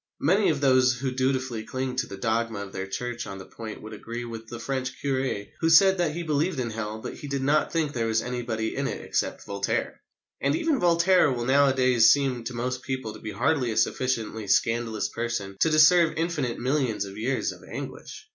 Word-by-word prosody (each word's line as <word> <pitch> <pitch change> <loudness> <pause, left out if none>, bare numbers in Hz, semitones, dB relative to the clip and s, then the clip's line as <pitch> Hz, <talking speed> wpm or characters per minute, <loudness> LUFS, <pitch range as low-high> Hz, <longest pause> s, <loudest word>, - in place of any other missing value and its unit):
Many 195 +7 +3
of 145 -3 0
those 130 -2 +4
who 130 +2 -3
dutifully 130 -3 -1
cling 130 +2 -3
to - - 0
the 100 - -8
dogma 110 0 -1
of 100 -1 -8
their 95 0 -4
Church 120 +4 -4
on 95 - -6
the 95 - -9
point 110 +1 -9
would 110 0 -8
agree 115 +3 -6
with 115 -1 -8
the 120 - -7
French 130 +1 -3
curé 130 -7 -2
who 165 - +2
said 190 +3 +6
that 165 -3 0
he 175 - -3
believed 155 0 0
in 120 -2 -2
Hell, 110 0 -4
but - - -6
he 145 - -9
did 140 -1 -2
not 150 +3 +2
think 155 -3 0
there 115 -2 -1
was 110 0 +2
anybody 120 -3 -3
in - - -1
it - - -4
except - - -2
Voltaire. 100 0 -2 0.4
And 140 +1 +2
even 300 - +1
Voltaire 175 -2 +4
will 120 -2 -2
nowadays 130 -3 +4
seem 130 -3 +2
to 125 - -4
most 125 +1 -2
people 130 -5 -4
to - - -11
be 110 - -6
hardly 140 -7 +1
a 110 - -4
sufficiently 115 -4 0
scandalous 115 0 +1
person 115 -5 -4
to 160 - +4
deserve 160 +2 +5
infinite 160 -7 -1
millions 125 -5 0
of 100 0 -9
years 130 +4 -1
of - - -13
anguish. 425 0 -8
125 Hz, 210 wpm, -26 LUFS, 115-145 Hz, 0.4 s, said